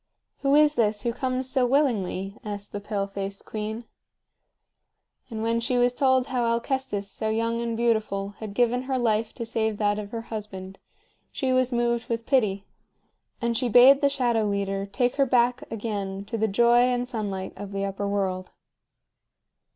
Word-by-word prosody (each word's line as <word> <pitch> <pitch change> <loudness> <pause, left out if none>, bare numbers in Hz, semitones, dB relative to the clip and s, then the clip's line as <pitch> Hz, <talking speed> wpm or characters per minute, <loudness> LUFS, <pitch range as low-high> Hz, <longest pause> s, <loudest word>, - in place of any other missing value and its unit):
"Who 275 0 +2
is 300 0 +5
this 210 -5 +1
who 235 - 0
comes 255 +1 -1
so 260 0 +1
willingly?" 210 -8 0
asked 205 -1 -6
the 205 - -4
pale 205 -1 -2
faced 195 0 -6
queen. 215 +2 -4 1.5
And 220 -2 -4
when 230 +1 +1
she 245 +2 0
was 245 0 +3
told 260 -1 +3
how 255 -2 -1
Alcestis, 235 -3 -1
so 220 +2 -3
young 230 +1 0
and 230 -1 -2
beautiful, 220 -4 0
had 215 -2 -7
given 245 +1 +2
her 260 - +1
life 225 -2 +1
to 235 - -4
save 220 -2 -1
that 205 0 +1
of 205 -1 -6
her 230 +1 -4
husband, 200 -4 -7 0.5
she 260 -2 -1
was 255 0 +2
moved 235 0 0
with 230 0 -2
pity; 205 -8 +1 0.8
and 235 0 +1
she 250 +1 +1
bade 255 +5 +7
the 280 - +4
Shadow 240 -5 +1
Leader 200 -1 -1
take 245 +6 0
her 275 - +4
back 245 0 +1
again 200 -3 -4
to 230 - -5
the 220 0 +1
joy 235 +4 +4
and 245 0 +2
sunlight 200 -6 -4
of 200 -1 -8
the 195 0 -2
Upper 200 +1 -3
World. 190 -2 -2
230 Hz, 175 wpm, -26 LUFS, 205-245 Hz, 1.5 s, bade